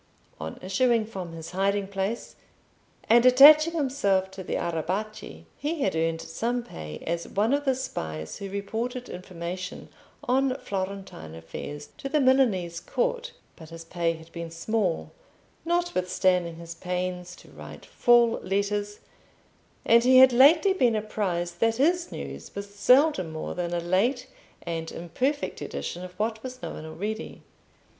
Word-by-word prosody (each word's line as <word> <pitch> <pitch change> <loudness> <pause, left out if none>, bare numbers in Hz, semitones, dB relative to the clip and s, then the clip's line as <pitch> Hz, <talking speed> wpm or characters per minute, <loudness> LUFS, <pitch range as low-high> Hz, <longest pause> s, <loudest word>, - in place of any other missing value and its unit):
On 80 0 -6
issuing 225 +4 +2
from 185 -6 -7
his 165 -1 -8
hiding 195 +1 0
place, 200 +3 -3 0.7
and 235 +1 +6
attaching 295 +6 +8
himself 205 - +1
to 190 - -8
the - - -3
Arrabbiati, 170 - -3 0.2
he 300 +2 -2
had 190 - 0
earned 165 0 0
some 235 +8 -2
pay 75 - -8
as 170 +1 -2
one 215 +6 +1
of 290 +1 0
the 265 -1 +2
spies 80 - -5
who 200 - -6
reported 225 +6 -4
information 180 +1 -6 0.3
on 260 +1 +2
Florentine 190 - -5
affairs 145 - -8
to 275 - -4
the 300 +2 +2
Milanese 230 -11 +2
court; - - -2 0.2
but 160 -2 -13
his 165 0 -10
pay 165 0 -1
had 160 0 -13
been 170 0 -6
small, 185 +2 -1 0.5
notwithstanding 185 - +1
his 170 0 -8
pains 180 +1 -4
to - - -17
write - - -11
full 240 -1 +4
letters, 205 +2 -2 0.8
and 235 +1 +6
he 255 +1 +6
had 260 -1 +8
lately 320 +10 +6
been 250 - +2
apprised 180 -5 -2
that 225 0 +2
his 340 +7 +1
news - - -8
was 200 0 -7
seldom 250 - +4
more 155 0 -5
than 175 -1 -3
a 175 - 0
late 205 +10 +1 0.4
and 165 -1 -4
imperfect 255 - -2
edition 175 - -5
of 180 0 -10
what 220 +1 -2
was 255 0 -7
known 155 - -6
already. 210 +7 -5
200 Hz, 145 wpm, -26 LUFS, 170-250 Hz, 0.8 s, attaching